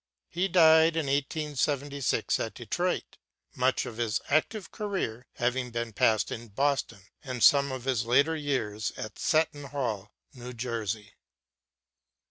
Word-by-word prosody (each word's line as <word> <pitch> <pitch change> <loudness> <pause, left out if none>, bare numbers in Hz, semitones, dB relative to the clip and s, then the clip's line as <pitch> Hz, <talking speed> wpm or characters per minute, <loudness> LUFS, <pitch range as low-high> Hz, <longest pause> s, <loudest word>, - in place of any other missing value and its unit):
He 180 +3 0
died 160 -3 +6
in 160 -2 0
1876 140 -1 -1
at - - -4
Detroit, - - -2 0.3
much - - +1
of 110 - -8
his 115 -2 0
active 185 +8 0
career 190 - -3
having 125 +1 -1
been 115 -1 -4
passed 110 +1 +2
in 120 +1 -6
Boston, 135 -2 -1 0.2
and 125 -3 -3
some 140 -1 +6
of 130 -2 -5
his 130 -3 0
later 140 +7 +3
years 110 -8 -2
at 110 -1 -7
Seton 155 -2 +1
Hall, 115 -8 -3 0.2
New 125 0 -8
Jersey. 110 -4 -4
130 Hz, 130 wpm, -28 LUFS, 115-150 Hz, 0.3 s, died